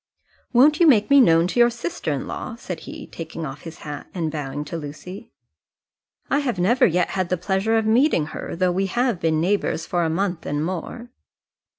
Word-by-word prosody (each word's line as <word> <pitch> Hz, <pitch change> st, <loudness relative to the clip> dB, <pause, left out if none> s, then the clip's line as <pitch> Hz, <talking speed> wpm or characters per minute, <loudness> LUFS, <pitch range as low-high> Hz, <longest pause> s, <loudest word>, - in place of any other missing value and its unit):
"Won't 285 Hz, +5 st, +5 dB
you 340 Hz, -, +6 dB
make 220 Hz, -4 st, +4 dB
me 280 Hz, -1 st, +8 dB
known 165 Hz, -6 st, +5 dB
to 190 Hz, +7 st, -1 dB
your 240 Hz, 0 st, +6 dB
sister 175 Hz, -9 st, -4 dB
in 140 Hz, -, -2 dB
law?" 245 Hz, -, -6 dB
said 185 Hz, -7 st, -6 dB
he, -, -, -8 dB
taking 165 Hz, 0 st, -7 dB
off 135 Hz, 0 st, -7 dB
his 165 Hz, -1 st, -10 dB
hat, 145 Hz, -1 st, -7 dB
and 165 Hz, -3 st, -2 dB
bowing 145 Hz, -1 st, -4 dB
to 150 Hz, -, -6 dB
Lucy. 155 Hz, +5 st, -8 dB, 1.0 s
"I 280 Hz, -, +1 dB
have 255 Hz, -8 st, -2 dB
never 235 Hz, +9 st, +4 dB
yet 180 Hz, -1 st, +1 dB
had 185 Hz, -2 st, -2 dB
the 180 Hz, -, 0 dB
pleasure 190 Hz, +5 st, 0 dB
of 220 Hz, -, +1 dB
meeting 225 Hz, -, +3 dB
her, -, -, -5 dB
though 180 Hz, +1 st, +1 dB
we 190 Hz, +2 st, 0 dB
have 240 Hz, -1 st, 0 dB
been 160 Hz, -2 st, +1 dB
neighbours 180 Hz, -2 st, 0 dB
for 175 Hz, -1 st, 0 dB
a 165 Hz, -, 0 dB
month 180 Hz, +1 st, -2 dB
and 145 Hz, +2 st, -1 dB
more." 185 Hz, +7 st, -6 dB
180 Hz, 205 wpm, -22 LUFS, 160-235 Hz, 1.0 s, me